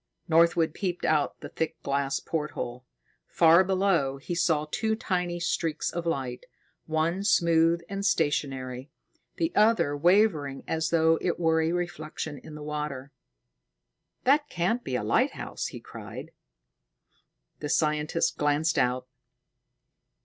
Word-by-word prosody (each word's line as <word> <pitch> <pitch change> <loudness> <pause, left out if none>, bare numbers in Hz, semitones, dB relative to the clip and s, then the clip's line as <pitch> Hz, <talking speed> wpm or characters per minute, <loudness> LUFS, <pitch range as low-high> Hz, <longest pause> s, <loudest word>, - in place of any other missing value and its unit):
Northwood 165 -1 +3
peeped 180 -3 -3
out 150 -2 +1
the - - -7
thick 160 -1 -3
glass 140 0 0
porthole. 130 -6 -4 0.4
Far 170 +2 +5
below, 185 -8 +1
he 135 +6 -5
saw 165 -3 +1
two 220 -1 0
tiny 180 -5 -2
streaks 165 -2 -1
of 170 0 -4
light, 130 -6 -3 0.4
one 165 +4 0
smooth 170 -3 +3
and 200 +1 -4
stationery, 135 -7 -1 0.5
the 330 0 -1
other 210 -9 +3
wavering 160 -4 +2
as 160 0 -1
though 160 -1 +3
it 175 - -1
were 160 -1 +3
a 160 +1 +1
reflection 160 -4 -4
in 150 -1 -10
water. 150 -2 -4 1.1
"That 290 +3 +3
can't 185 +8 0
be 130 - -3
a 115 - -1
lighthouse!" 105 - 0
he - - -8
cried. - - -9 1.3
The 150 - -4
scientist 150 +1 +1
glanced 150 +2 +2
out. 125 0 0
160 Hz, 125 wpm, -27 LUFS, 145-175 Hz, 1.3 s, Far